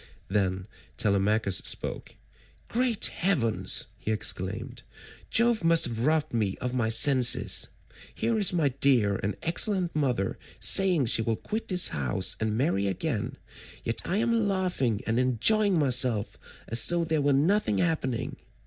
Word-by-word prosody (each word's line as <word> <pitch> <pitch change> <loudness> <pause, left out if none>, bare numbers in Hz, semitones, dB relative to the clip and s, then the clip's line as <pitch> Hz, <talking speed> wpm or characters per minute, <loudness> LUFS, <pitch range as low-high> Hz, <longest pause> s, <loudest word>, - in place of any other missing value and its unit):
Then 95 -2 -2 0.3
Telemachus 100 -1 0
spoke. - - -2 0.5
"Great 240 -2 0
heavens!" 145 - 0
he - - -7
exclaimed, 95 -3 -3 0.5
"Jove 235 -3 +2
must 165 0 +4
have 115 -2 -5
robbed 155 -3 0
me 105 -5 -2
of 125 0 -4
my 120 -3 -1
senses. 125 +2 +5 0.5
Here 230 -2 -2
is 200 - +3
my 165 -5 0
dear 125 -7 +1
and 100 0 -4
excellent 180 +1 +1
mother 125 -10 -2 0.2
saying 180 -8 +4
she 115 - 0
will 115 0 -2
quit 220 - -6
this 180 -2 +5
house 80 +6 0
and 110 -1 -3
marry 115 - -1
again, 95 - -4 0.5
yet 115 - -1
I 190 - -3
am 230 -1 0
laughing 180 - -2
and 115 +2 -1
enjoying 180 - +2
myself 125 -7 +1 0.3
as 115 +1 +3
though 175 -1 0
there 160 -2 -2
were 145 0 0
nothing 150 - 0
happening. 145 - -3
130 Hz, 140 wpm, -26 LUFS, 110-180 Hz, 0.5 s, senses